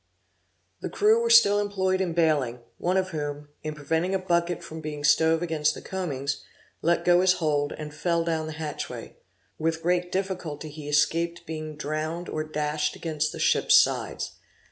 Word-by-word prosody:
The -, -, -3 dB
crew 220 Hz, +2 st, +3 dB
were 235 Hz, -, 0 dB
still 220 Hz, -3 st, +7 dB
employed 190 Hz, -2 st, 0 dB
in 175 Hz, -3 st, -1 dB
baling; 145 Hz, -8 st, +1 dB, 0.2 s
one 180 Hz, +2 st, +1 dB
of 185 Hz, 0 st, 0 dB
whom, 145 Hz, -3 st, -5 dB
in 155 Hz, -1 st, -5 dB
preventing 160 Hz, +6 st, -1 dB
a -, -, +4 dB
bucket 175 Hz, -2 st, 0 dB
from 160 Hz, 0 st, -8 dB
being 150 Hz, -1 st, -5 dB
stove 160 Hz, +3 st, +4 dB
against 160 Hz, -3 st, +1 dB
the -, -, -8 dB
combings, 140 Hz, -7 st, -3 dB, 0.4 s
let 170 Hz, +1 st, +1 dB
go 175 Hz, 0 st, +5 dB
his 185 Hz, 0 st, +5 dB
hold, 150 Hz, -5 st, 0 dB
and 150 Hz, -1 st, -7 dB
fell 170 Hz, +2 st, 0 dB
down 160 Hz, -1 st, -1 dB
the 155 Hz, -, -5 dB
hatchway; 155 Hz, -1 st, -6 dB, 0.4 s
with 165 Hz, +1 st, -1 dB
great 180 Hz, +1 st, +1 dB
difficulty 180 Hz, -6 st, -3 dB
he 150 Hz, 0 st, -8 dB
escaped 170 Hz, +3 st, +1 dB
being 155 Hz, -1 st, -6 dB
drowned 155 Hz, +3 st, -3 dB
or 155 Hz, -, -2 dB
dashed 150 Hz, -1 st, -1 dB
against 155 Hz, -2 st, -2 dB
the -, -, -8 dB
ship's -, -, +5 dB
sides. -, -, 0 dB
160 Hz, 170 wpm, -26 LUFS, 150-175 Hz, 0.4 s, still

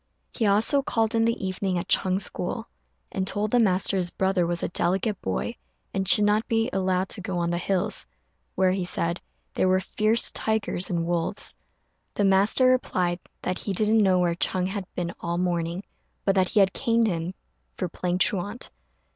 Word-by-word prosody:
He 225 Hz, -, 0 dB
also 220 Hz, +8 st, +3 dB
called 225 Hz, -4 st, 0 dB
in 225 Hz, 0 st, +2 dB
the 230 Hz, -4 st, -1 dB
evening 185 Hz, 0 st, -2 dB
at 175 Hz, -, -4 dB
Ch'êng's 190 Hz, +1 st, +1 dB
school, -, -, -4 dB, 0.4 s
and 190 Hz, -, -2 dB
told 205 Hz, +2 st, -1 dB
the 245 Hz, -, +4 dB
master 195 Hz, -2 st, +2 dB
his 180 Hz, -2 st, +1 dB
brother 190 Hz, -1 st, 0 dB
was 175 Hz, 0 st, -2 dB
a -, -, +1 dB
delicate 190 Hz, +4 st, -1 dB
boy, 235 Hz, -, -3 dB, 0.4 s
and 190 Hz, -1 st, -1 dB
should 210 Hz, -, +5 dB
not 210 Hz, +2 st, +2 dB
be 225 Hz, +2 st, 0 dB
allowed 185 Hz, 0 st, 0 dB
to 205 Hz, -, -2 dB
go 185 Hz, -2 st, -3 dB
on 170 Hz, 0 st, 0 dB
the 175 Hz, -, -1 dB
hills, 185 Hz, 0 st, 0 dB, 0.5 s
where, 185 Hz, -1 st, +3 dB
he 185 Hz, 0 st, -1 dB
said, 170 Hz, 0 st, 0 dB, 0.3 s
there -, -, +1 dB
were 185 Hz, 0 st, +3 dB
fierce 215 Hz, +4 st, +2 dB
tigers 220 Hz, -4 st, 0 dB
and 170 Hz, -2 st, -1 dB
wolves. 175 Hz, +3 st, -2 dB, 0.6 s
The 205 Hz, -, +1 dB
master 195 Hz, +6 st, +3 dB
replied 185 Hz, -9 st, +1 dB, 0.2 s
that 185 Hz, -, -2 dB
he 200 Hz, -, -3 dB
didn't 215 Hz, +3 st, +3 dB
know 190 Hz, -2 st, +4 dB
where 175 Hz, -1 st, +2 dB
Ch'êng 185 Hz, +1 st, 0 dB
had 195 Hz, -2 st, -4 dB
been 170 Hz, -1 st, -3 dB
all 170 Hz, 0 st, -3 dB
the 180 Hz, -, 0 dB
morning, 175 Hz, +1 st, -2 dB, 0.4 s
but 195 Hz, -, +3 dB
that 185 Hz, -1 st, +2 dB
he 210 Hz, -, +4 dB
had 190 Hz, -1 st, +3 dB
caned 230 Hz, -3 st, +2 dB
him 175 Hz, -2 st, -2 dB, 0.4 s
for 185 Hz, -, -2 dB
playing 175 Hz, +1 st, -2 dB
truant. 205 Hz, +5 st, +1 dB
190 Hz, 190 wpm, -25 LUFS, 180-210 Hz, 0.6 s, should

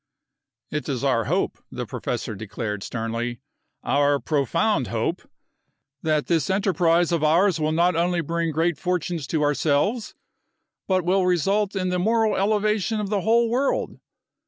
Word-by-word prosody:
"It 150 Hz, 0 st, -3 dB
is 135 Hz, -2 st, -2 dB
our 125 Hz, -5 st, +2 dB
hope," -, -, -1 dB
the -, -, -4 dB
professor -, -, -4 dB
declared, 105 Hz, 0 st, -5 dB
sternly, 115 Hz, +2 st, -3 dB, 0.4 s
"our 145 Hz, 0 st, +2 dB
profound 140 Hz, -5 st, 0 dB
hope, -, -, -2 dB, 0.8 s
that 155 Hz, -2 st, +1 dB
this 165 Hz, -5 st, 0 dB
enterprise 175 Hz, -3 st, +2 dB
of 165 Hz, -3 st, 0 dB
ours 170 Hz, +3 st, +3 dB
will 155 Hz, 0 st, 0 dB
not 170 Hz, +2 st, +2 dB
only 175 Hz, +1 st, +1 dB
bring 165 Hz, +1 st, -1 dB
great 160 Hz, 0 st, 0 dB
fortunes 175 Hz, -4 st, -2 dB
to 155 Hz, -2 st, 0 dB
ourselves 150 Hz, -, 0 dB, 0.7 s
but 185 Hz, -2 st, +1 dB
will 185 Hz, +1 st, +2 dB
result 195 Hz, +4 st, +1 dB
in 185 Hz, -1 st, -1 dB
the 180 Hz, 0 st, 0 dB
moral 220 Hz, +3 st, +2 dB
elevation 210 Hz, +1 st, +1 dB
of 205 Hz, -1 st, -3 dB
the 205 Hz, -2 st, +1 dB
whole 230 Hz, +4 st, +3 dB
world. 255 Hz, +4 st, -1 dB
170 Hz, 145 wpm, -24 LUFS, 145-195 Hz, 0.8 s, ours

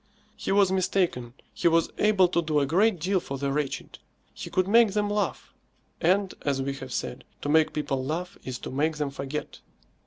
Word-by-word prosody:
He -, -, -3 dB
was 195 Hz, -1 st, +4 dB
mistaken. 175 Hz, -10 st, 0 dB, 0.2 s
He -, -, +1 dB
was 165 Hz, 0 st, +3 dB
able 205 Hz, -3 st, +5 dB
to 170 Hz, -, +1 dB
do 155 Hz, -2 st, +1 dB
a 140 Hz, -, +2 dB
great 185 Hz, +6 st, +2 dB
deal 185 Hz, +4 st, +1 dB
for 140 Hz, -5 st, -6 dB
the 140 Hz, 0 st, -1 dB
wretched. 145 Hz, -1 st, -3 dB, 0.3 s
He -, -, -7 dB
could 185 Hz, 0 st, +1 dB
make 225 Hz, -1 st, +5 dB
them 205 Hz, -1 st, 0 dB
laugh; 205 Hz, 0 st, -2 dB, 0.5 s
and, 190 Hz, +3 st, +2 dB
as 140 Hz, -2 st, 0 dB
we 135 Hz, +1 st, -2 dB
have 135 Hz, -1 st, -8 dB
said, -, -, -4 dB, 0.2 s
to 145 Hz, -, -2 dB
make 160 Hz, +1 st, +4 dB
people 135 Hz, -3 st, -2 dB
laugh 175 Hz, +7 st, -3 dB
is 130 Hz, -1 st, -5 dB
to -, -, -5 dB
make 150 Hz, +4 st, 0 dB
them 145 Hz, -2 st, -2 dB
forget. 140 Hz, +2 st, -5 dB
160 Hz, 195 wpm, -27 LUFS, 140-190 Hz, 0.5 s, able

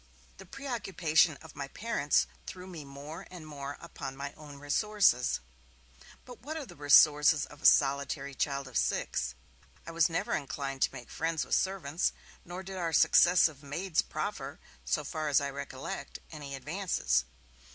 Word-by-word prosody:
The -, -, -12 dB
preoccupation 185 Hz, -, +1 dB
of 160 Hz, -, -13 dB
my 140 Hz, -1 st, -4 dB
parents 180 Hz, -5 st, +1 dB, 0.2 s
threw 180 Hz, 0 st, -7 dB
me 175 Hz, -5 st, -8 dB
more 145 Hz, +6 st, -9 dB
and 175 Hz, -3 st, -10 dB
more 145 Hz, -2 st, -6 dB
upon 135 Hz, -1 st, -7 dB
my 140 Hz, +1 st, -5 dB
own 150 Hz, -2 st, -12 dB
resources. 145 Hz, -, +2 dB, 0.9 s
But 250 Hz, -2 st, -11 dB
what 310 Hz, +5 st, -5 dB
are 300 Hz, -, -5 dB
the -, -, -13 dB
resources 150 Hz, +1 st, +6 dB
of 145 Hz, 0 st, -15 dB
a -, -, +6 dB
solitary 140 Hz, 0 st, +3 dB
child 140 Hz, 0 st, -1 dB
of 130 Hz, -, 0 dB
six? 60 Hz, -, -1 dB, 0.5 s
I -, -, -6 dB
was 165 Hz, +1 st, +3 dB
never 165 Hz, -, -1 dB
inclined 135 Hz, 0 st, -3 dB
to -, -, +3 dB
make 120 Hz, -, -10 dB
friends 160 Hz, -4 st, -1 dB
with -, -, -5 dB
servants, 180 Hz, -4 st, +1 dB, 0.3 s
nor 180 Hz, +2 st, -7 dB
did 190 Hz, 0 st, -7 dB
our 170 Hz, -2 st, -2 dB
successive 160 Hz, -2 st, +5 dB
maids 160 Hz, +5 st, 0 dB
proffer, -, -, -5 dB, 0.3 s
so 65 Hz, -, 0 dB
far 155 Hz, -1 st, -3 dB
as 145 Hz, -, +5 dB
I 140 Hz, -1 st, -3 dB
recollect, 140 Hz, 0 st, -6 dB
any 145 Hz, -3 st, -6 dB
advances. 165 Hz, -, 0 dB
150 Hz, 160 wpm, -31 LUFS, 140-175 Hz, 0.9 s, resources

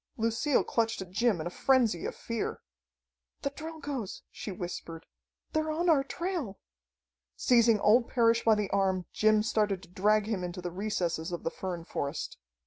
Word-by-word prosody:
Lucille 230 Hz, +5 st, +2 dB
clutched 225 Hz, -1 st, 0 dB
at 180 Hz, -, -16 dB
Jim 220 Hz, -1 st, +2 dB
in 155 Hz, -, -4 dB
a 175 Hz, -, -3 dB
frenzy 240 Hz, -7 st, +2 dB
of -, -, -5 dB
fear. 230 Hz, -1 st, -3 dB, 0.8 s
"The 280 Hz, -, 0 dB
Drilgoes!" 290 Hz, -, -6 dB
she 210 Hz, -, -6 dB
whispered. 175 Hz, -2 st, -6 dB, 0.5 s
"They're 310 Hz, 0 st, +1 dB
on 335 Hz, +3 st, +1 dB
our 280 Hz, -4 st, +4 dB
trail!" 330 Hz, -, -3 dB, 0.8 s
Seizing 235 Hz, -, +4 dB
old 230 Hz, +4 st, +5 dB
Parrish 230 Hz, -1 st, +3 dB
by 225 Hz, -1 st, +5 dB
the 210 Hz, -2 st, -2 dB
arm, 190 Hz, -2 st, +1 dB
Jim 215 Hz, 0 st, +4 dB
started 210 Hz, -4 st, 0 dB
to 170 Hz, -, -14 dB
drag 210 Hz, +3 st, +2 dB
him 210 Hz, -4 st, -2 dB
into 180 Hz, +1 st, -4 dB
the 175 Hz, -1 st, -4 dB
recesses 180 Hz, -3 st, -2 dB
of 175 Hz, -, -4 dB
the 165 Hz, -, -1 dB
fern 175 Hz, -3 st, -5 dB
forest. 140 Hz, -3 st, -4 dB
215 Hz, 165 wpm, -30 LUFS, 185-245 Hz, 0.8 s, old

